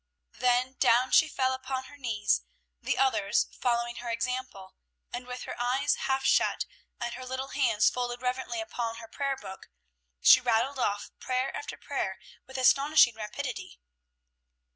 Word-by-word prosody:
Then 250 Hz, +1 st, +2 dB
down 245 Hz, +2 st, +4 dB
she 320 Hz, -, +6 dB
fell 260 Hz, -3 st, 0 dB
upon 260 Hz, 0 st, -4 dB
her 260 Hz, -, -13 dB
knees, 220 Hz, -, 0 dB, 0.4 s
the -, -, -1 dB
others 265 Hz, -7 st, +2 dB
following 240 Hz, -1 st, -1 dB
her 240 Hz, 0 st, -5 dB
example, 235 Hz, -5 st, -3 dB, 0.4 s
and 245 Hz, +1 st, -5 dB
with 250 Hz, 0 st, -6 dB
her -, -, -6 dB
eyes 260 Hz, +4 st, +2 dB
half 265 Hz, 0 st, -1 dB
shut, -, -, +3 dB, 0.3 s
and 240 Hz, 0 st, -3 dB
her 255 Hz, -, -7 dB
little 260 Hz, +1 st, -4 dB
hands 230 Hz, -6 st, +2 dB
folded 245 Hz, -1 st, -3 dB
reverently 255 Hz, +7 st, -2 dB
upon 240 Hz, -9 st, -3 dB
her 230 Hz, 0 st, -10 dB
prayer 275 Hz, +3 st, -2 dB
book, 190 Hz, -5 st, -10 dB, 0.5 s
she -, -, +8 dB
rattled 245 Hz, +3 st, +1 dB
off 205 Hz, -4 st, -1 dB
prayer 255 Hz, +1 st, -1 dB
after 435 Hz, -, -6 dB
prayer -, -, -3 dB, 0.3 s
with 265 Hz, 0 st, -8 dB
astonishing 275 Hz, 0 st, +5 dB
rapidity. 220 Hz, -, -6 dB
250 Hz, 150 wpm, -29 LUFS, 235-265 Hz, 0.5 s, she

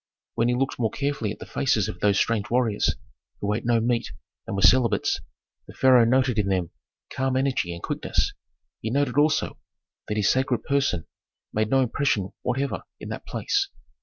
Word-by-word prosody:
When 115 Hz, 0 st, +1 dB
he 120 Hz, -, +2 dB
looked 130 Hz, 0 st, -1 dB
more 115 Hz, -2 st, +2 dB
carefully 140 Hz, -6 st, -2 dB
at -, -, -7 dB
the -, -, -9 dB
faces 115 Hz, -8 st, +1 dB
of 90 Hz, -, -6 dB
those 100 Hz, 0 st, +3 dB
strange 110 Hz, -1 st, +1 dB
warriors, 120 Hz, -4 st, +1 dB, 0.4 s
who 100 Hz, +1 st, 0 dB
ate 115 Hz, +2 st, -3 dB
no 120 Hz, -1 st, +4 dB
meat 120 Hz, +1 st, 0 dB, 0.4 s
and -, -, -3 dB
were 95 Hz, -, 0 dB
celibates, 110 Hz, +1 st, +4 dB, 0.5 s
the -, -, -12 dB
pharaoh 125 Hz, -3 st, +6 dB
noted 125 Hz, -1 st, +2 dB
in 100 Hz, -, +1 dB
them 90 Hz, -4 st, 0 dB, 0.4 s
calm 130 Hz, 0 st, 0 dB
energy 130 Hz, -9 st, 0 dB
and 85 Hz, 0 st, -8 dB
quickness; -, -, -1 dB, 0.5 s
he 110 Hz, -, -2 dB
noted 135 Hz, 0 st, 0 dB
also 155 Hz, +1 st, +1 dB, 0.5 s
that 105 Hz, -, -2 dB
his 105 Hz, -1 st, +2 dB
sacred 130 Hz, -2 st, +1 dB
person 140 Hz, -, 0 dB, 0.5 s
made 110 Hz, 0 st, 0 dB
no 135 Hz, +2 st, +4 dB
impression 120 Hz, -6 st, 0 dB
whatever 135 Hz, +3 st, -1 dB, 0.2 s
in -, -, -8 dB
that -, -, -7 dB
place. 395 Hz, -1 st, 0 dB
120 Hz, 180 wpm, -25 LUFS, 105-130 Hz, 0.5 s, pharaoh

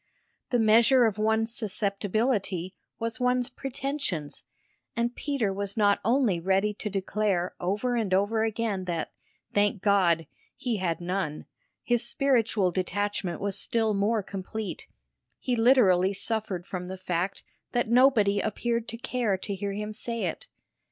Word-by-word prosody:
The 245 Hz, -, +2 dB
measure 230 Hz, +3 st, +5 dB
of 215 Hz, -2 st, 0 dB
one's 220 Hz, +1 st, +1 dB
susceptibility 200 Hz, -2 st, -1 dB, 0.2 s
was 230 Hz, +2 st, -4 dB
one's 250 Hz, 0 st, +1 dB
pretensions, 270 Hz, -, -4 dB, 0.5 s
and 235 Hz, +1 st, -1 dB
Peter 265 Hz, -9 st, -1 dB
was 200 Hz, +1 st, -4 dB
not 205 Hz, -2 st, +4 dB
only 230 Hz, -5 st, +2 dB
ready 195 Hz, +4 st, +1 dB
to 210 Hz, +1 st, -5 dB
declare 195 Hz, -2 st, -1 dB
over 210 Hz, +7 st, -1 dB
and 220 Hz, -5 st, -1 dB
over 205 Hz, +4 st, +2 dB
again 220 Hz, -4 st, -1 dB
that, 170 Hz, -3 st, -3 dB, 0.4 s
thank 205 Hz, -1 st, +2 dB
God, 180 Hz, -5 st, +3 dB, 0.3 s
he 240 Hz, -4 st, -2 dB
had 175 Hz, -3 st, -1 dB
none: 175 Hz, -4 st, -3 dB, 0.4 s
his 240 Hz, -1 st, +1 dB
spiritual 230 Hz, -7 st, +2 dB
detachment 185 Hz, -1 st, -2 dB
was 200 Hz, -1 st, -2 dB
still 225 Hz, -2 st, 0 dB
more 205 Hz, +2 st, +1 dB
complete 200 Hz, +2 st, -6 dB, 0.5 s
he 250 Hz, -, -1 dB
literally 210 Hz, -6 st, +4 dB
suffered 200 Hz, -3 st, -1 dB
from 180 Hz, -2 st, -5 dB
the 190 Hz, +1 st, -6 dB
fact 185 Hz, +1 st, -2 dB, 0.3 s
that 240 Hz, -2 st, +1 dB
nobody 230 Hz, -5 st, +4 dB
appeared 230 Hz, +2 st, -1 dB
to 230 Hz, -, -5 dB
care 240 Hz, -5 st, -1 dB
to 200 Hz, +2 st, -4 dB
hear 200 Hz, +1 st, -3 dB
him 210 Hz, +1 st, -4 dB
say 230 Hz, 0 st, -3 dB
it. 175 Hz, -, -3 dB
210 Hz, 140 wpm, -27 LUFS, 190-230 Hz, 0.5 s, measure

